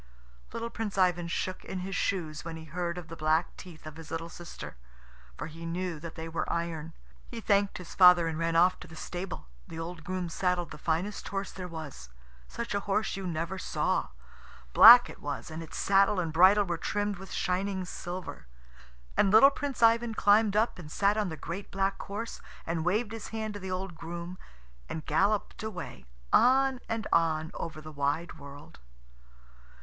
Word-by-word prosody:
Little 230 Hz, 0 st, -4 dB
Prince 215 Hz, -4 st, -4 dB
Ivan 175 Hz, -2 st, +2 dB
shook 185 Hz, +2 st, -3 dB
in 185 Hz, -, -5 dB
his 190 Hz, +1 st, -4 dB
shoes 160 Hz, -7 st, -2 dB
when 165 Hz, 0 st, -6 dB
he 160 Hz, -, -10 dB
heard 170 Hz, +2 st, -3 dB
of 175 Hz, -2 st, -7 dB
the 165 Hz, -, -8 dB
black 155 Hz, +2 st, +1 dB
teeth 170 Hz, -4 st, -12 dB
of 155 Hz, 0 st, -9 dB
his 165 Hz, -2 st, -10 dB
little 165 Hz, +1 st, -4 dB
sister, 170 Hz, -, -9 dB, 0.6 s
for -, -, -4 dB
he 165 Hz, +1 st, -9 dB
knew 170 Hz, -1 st, -3 dB
that 165 Hz, +1 st, -8 dB
they 160 Hz, 0 st, -6 dB
were 165 Hz, 0 st, -3 dB
iron. 165 Hz, -1 st, -3 dB, 0.3 s
He 235 Hz, -, -7 dB
thanked 200 Hz, -2 st, +2 dB
his 180 Hz, -, -9 dB
father 180 Hz, -2 st, +7 dB
and 160 Hz, -1 st, -3 dB
ran 165 Hz, 0 st, 0 dB
off 180 Hz, +2 st, +4 dB
to -, -, -11 dB
the 160 Hz, -, -12 dB
stable. 180 Hz, +3 st, -6 dB, 0.2 s
The 160 Hz, -, -8 dB
old 165 Hz, 0 st, -6 dB
groom 185 Hz, 0 st, -3 dB
saddled 175 Hz, 0 st, -1 dB
the -, -, -9 dB
finest 170 Hz, +7 st, -2 dB
horse 195 Hz, 0 st, -3 dB
there 185 Hz, -1 st, -7 dB
was. 155 Hz, -, -8 dB, 0.4 s
Such 235 Hz, -2 st, -5 dB
a 200 Hz, -, +1 dB
horse 200 Hz, +1 st, -1 dB
you 195 Hz, -1 st, -4 dB
never 170 Hz, +3 st, -3 dB
saw. -, -, 0 dB, 0.7 s
Black 240 Hz, +2 st, +11 dB
it -, -, -12 dB
was, 145 Hz, +2 st, -5 dB
and 160 Hz, +1 st, -5 dB
its 165 Hz, -, -8 dB
saddle 195 Hz, 0 st, +3 dB
and 165 Hz, -3 st, -2 dB
bridle 190 Hz, +5 st, +6 dB
were 170 Hz, -2 st, -3 dB
trimmed 205 Hz, +3 st, -1 dB
with 195 Hz, -1 st, -10 dB
shining 190 Hz, +1 st, -1 dB
silver. 180 Hz, -, -7 dB, 0.7 s
And 200 Hz, -, +4 dB
little 225 Hz, +8 st, +8 dB
Prince 275 Hz, -4 st, -3 dB
Ivan 230 Hz, 0 st, +4 dB
climbed 205 Hz, 0 st, +4 dB
up 220 Hz, -2 st, +1 dB
and 150 Hz, -4 st, -10 dB
sat 200 Hz, +3 st, +2 dB
on 210 Hz, -3 st, 0 dB
the 160 Hz, -, -6 dB
great 190 Hz, +6 st, -6 dB
black 195 Hz, 0 st, -1 dB
horse, 215 Hz, +4 st, -6 dB, 0.2 s
and 165 Hz, -1 st, -2 dB
waved 210 Hz, +6 st, 0 dB
his 225 Hz, -2 st, -6 dB
hand 220 Hz, -1 st, -4 dB
to 205 Hz, -, -6 dB
the 190 Hz, -1 st, -6 dB
old 185 Hz, 0 st, -3 dB
groom, 170 Hz, +2 st, -7 dB, 0.5 s
and 160 Hz, -, -5 dB
galloped 200 Hz, +7 st, +1 dB
away, 200 Hz, -, -7 dB, 0.3 s
on 265 Hz, +1 st, +5 dB
and 225 Hz, -1 st, -2 dB
on 160 Hz, -1 st, +2 dB
over 160 Hz, -2 st, -6 dB
the 155 Hz, 0 st, -9 dB
wide 150 Hz, +4 st, -2 dB
world. 140 Hz, +1 st, -12 dB
180 Hz, 190 wpm, -29 LUFS, 165-200 Hz, 0.7 s, Black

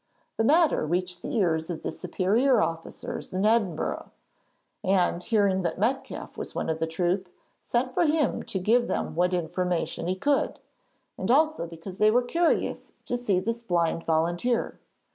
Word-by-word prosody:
The 225 Hz, -, +2 dB
matter 315 Hz, +5 st, +4 dB
reached 180 Hz, +3 st, -2 dB
the -, -, -4 dB
ears 165 Hz, -6 st, +1 dB
of 170 Hz, -, -5 dB
the -, -, -2 dB
superior 215 Hz, +8 st, +2 dB
officers 165 Hz, +1 st, -4 dB
in 190 Hz, +2 st, +1 dB
Edinburgh, 210 Hz, -7 st, 0 dB, 0.7 s
and, 185 Hz, -2 st, +2 dB
hearing 200 Hz, -2 st, +2 dB
that 170 Hz, -3 st, -2 dB
Metcalfe 250 Hz, +7 st, -2 dB
was -, -, -6 dB
one -, -, -1 dB
of 160 Hz, -, -3 dB
the 160 Hz, -, 0 dB
troop, 180 Hz, +3 st, -1 dB, 0.3 s
sent 250 Hz, +2 st, -1 dB
for 330 Hz, +5 st, +2 dB
him 300 Hz, -3 st, +1 dB
to -, -, -4 dB
give 230 Hz, +6 st, +2 dB
them -, -, -2 dB
what 180 Hz, +3 st, +2 dB
information 175 Hz, -1 st, -1 dB
he 185 Hz, -, 0 dB
could, 280 Hz, +9 st, 0 dB, 0.6 s
and -, -, -3 dB
also 310 Hz, -, +3 dB
because 170 Hz, +3 st, -10 dB
they 215 Hz, -, +6 dB
were 245 Hz, +3 st, +3 dB
curious 335 Hz, +7 st, 0 dB
to -, -, -1 dB
see 215 Hz, -7 st, +1 dB
this 230 Hz, +4 st, -3 dB
blind 170 Hz, -5 st, 0 dB
volunteer. 175 Hz, +9 st, 0 dB
190 Hz, 160 wpm, -27 LUFS, 175-240 Hz, 0.7 s, they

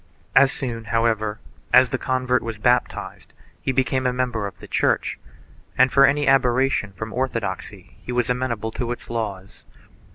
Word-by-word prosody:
As 135 Hz, -1 st, +6 dB
soon, 115 Hz, -4 st, -5 dB
however, 110 Hz, -2 st, 0 dB, 0.3 s
as 125 Hz, 0 st, +6 dB
the 130 Hz, -, -2 dB
convert 130 Hz, -1 st, 0 dB
was 115 Hz, -1 st, -5 dB
baptized 120 Hz, +3 st, -1 dB, 0.3 s
he -, -, -1 dB
became 130 Hz, 0 st, +1 dB
a -, -, +2 dB
member 125 Hz, -4 st, -1 dB
of 100 Hz, -, -10 dB
the -, -, -12 dB
Church -, -, 0 dB, 0.6 s
and 130 Hz, +1 st, +5 dB
for 140 Hz, 0 st, +6 dB
any 145 Hz, +1 st, +1 dB
aberration 130 Hz, -4 st, +2 dB
from 110 Hz, +3 st, -7 dB
orthodoxy 105 Hz, -6 st, -4 dB
he -, -, -7 dB
was 125 Hz, -1 st, 0 dB
amenable 125 Hz, -3 st, -2 dB
to 120 Hz, +1 st, -3 dB
its 120 Hz, -, -7 dB
laws. 100 Hz, -5 st, -5 dB
120 Hz, 160 wpm, -22 LUFS, 110-130 Hz, 0.6 s, As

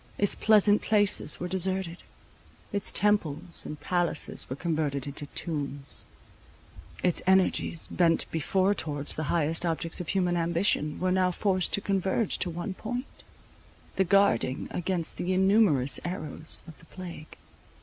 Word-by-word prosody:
Its 205 Hz, -, +2 dB
pleasant 210 Hz, -1 st, +4 dB
places 205 Hz, -8 st, +2 dB
were 180 Hz, -, -3 dB
deserted; 185 Hz, -1 st, 0 dB, 0.8 s
its 200 Hz, -1 st, 0 dB
temples 175 Hz, -5 st, +1 dB
and 150 Hz, -, -7 dB
palaces 175 Hz, -4 st, 0 dB
were 130 Hz, -, -3 dB
converted 150 Hz, -4 st, -2 dB
into 145 Hz, +1 st, -7 dB
tombs; 145 Hz, -3 st, -4 dB, 1.0 s
its 180 Hz, -2 st, +2 dB
energies, 190 Hz, -3 st, +2 dB
bent 170 Hz, -2 st, +2 dB
before 190 Hz, +5 st, +1 dB
towards 145 Hz, -6 st, -3 dB
the 155 Hz, -, -3 dB
highest 165 Hz, 0 st, +2 dB
objects 165 Hz, 0 st, -2 dB
of 175 Hz, -, -7 dB
human 180 Hz, -2 st, +1 dB
ambition, 170 Hz, -2 st, +1 dB
were 185 Hz, 0 st, 0 dB
now 185 Hz, 0 st, +2 dB
forced 185 Hz, 0 st, 0 dB
to 200 Hz, -, +1 dB
converge 195 Hz, +2 st, 0 dB
to 180 Hz, -, 0 dB
one 175 Hz, +4 st, -4 dB
point, 245 Hz, +6 st, -4 dB, 0.9 s
the 190 Hz, -, +3 dB
guarding 190 Hz, -, +2 dB
against 175 Hz, -2 st, -3 dB
the 185 Hz, +1 st, -1 dB
innumerous 190 Hz, -, +3 dB
arrows 160 Hz, -3 st, -4 dB
of 160 Hz, -, -11 dB
the -, -, -17 dB
plague. 170 Hz, -3 st, -10 dB
175 Hz, 140 wpm, -28 LUFS, 155-190 Hz, 1.0 s, pleasant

